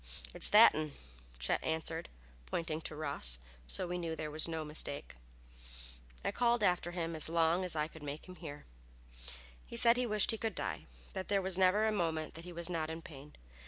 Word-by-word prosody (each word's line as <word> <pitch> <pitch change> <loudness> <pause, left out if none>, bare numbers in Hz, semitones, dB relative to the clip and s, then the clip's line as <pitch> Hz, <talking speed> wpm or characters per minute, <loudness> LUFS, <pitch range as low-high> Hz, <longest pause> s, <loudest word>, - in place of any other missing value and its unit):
"It's - - +5
that 215 +2 +9
'un," 155 -2 -3 0.4
Chet 60 0 0
answered, 160 +1 -2 0.4
pointing 160 - -2
to 155 - -5
Ross, 140 - +1 0.3
so - - -1
we 180 0 -3
knew 165 -2 -3
there 155 -1 -5
was 155 +2 -1
no 160 -1 -3
mistake. 150 - -3 1.1
I - - +1
called 240 -2 +2
after 180 -2 +2
him 170 -2 -3
as 155 0 -1
long 165 +2 +2
as 180 -3 +1
I 150 0 0
could 160 0 -13
make 145 +3 -6
him 180 0 -10
hear. 150 -3 -8 1.0
He - - -7
said 235 +1 +6
he 250 -1 +1
wished 215 -2 +4
he 225 - -4
could 220 -4 -2
die, 95 -6 -3 0.3
that 185 - -4
there 200 -1 +2
was 190 -1 +3
never 190 +3 +4
a 220 - +2
moment 165 -6 -1
that 165 +1 -10
he 180 - -8
was 170 -1 0
not 165 -3 -2
in 160 +1 -6
pain. 145 -1 -11
165 Hz, 200 wpm, -34 LUFS, 155-185 Hz, 1.1 s, that